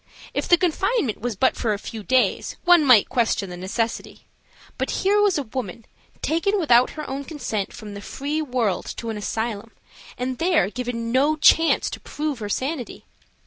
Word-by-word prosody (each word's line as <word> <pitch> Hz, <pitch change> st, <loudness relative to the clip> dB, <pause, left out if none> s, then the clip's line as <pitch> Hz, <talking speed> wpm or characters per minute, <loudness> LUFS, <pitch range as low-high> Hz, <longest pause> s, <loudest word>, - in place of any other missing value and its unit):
If -, -, -2 dB
the 350 Hz, -, +6 dB
confinement 360 Hz, -, 0 dB
was 240 Hz, -2 st, -2 dB
but 260 Hz, +7 st, +2 dB
for 220 Hz, -3 st, 0 dB
a -, -, -2 dB
few 220 Hz, +2 st, -7 dB
days 255 Hz, +4 st, +1 dB
one 350 Hz, -2 st, +6 dB
might 250 Hz, -7 st, +6 dB
question 230 Hz, -6 st, 0 dB
the -, -, -6 dB
necessity. 210 Hz, +6 st, -4 dB, 0.5 s
But -, -, -1 dB, 0.2 s
here 410 Hz, +1 st, +4 dB
was 405 Hz, -4 st, +3 dB
a 290 Hz, -, -1 dB
woman 230 Hz, -3 st, -6 dB, 0.4 s
taken 395 Hz, +6 st, +1 dB
without 250 Hz, -9 st, +4 dB
her 305 Hz, -, -5 dB
own 275 Hz, +1 st, -4 dB
consent 240 Hz, -, -4 dB
from 210 Hz, -2 st, -9 dB
the 200 Hz, -, -8 dB
free 290 Hz, +7 st, -3 dB
world 245 Hz, -, -1 dB
to 230 Hz, -1 st, -4 dB
an 215 Hz, -, -5 dB
asylum 220 Hz, +1 st, -4 dB, 0.4 s
and 255 Hz, 0 st, -3 dB
there 330 Hz, -, +2 dB
given 235 Hz, -2 st, -4 dB
no 280 Hz, +5 st, +3 dB
chance 325 Hz, +1 st, +4 dB
to -, -, -6 dB
prove 300 Hz, -4 st, -4 dB
her 210 Hz, -2 st, -5 dB
sanity. 260 Hz, +4 st, -3 dB
250 Hz, 180 wpm, -23 LUFS, 220-310 Hz, 0.5 s, the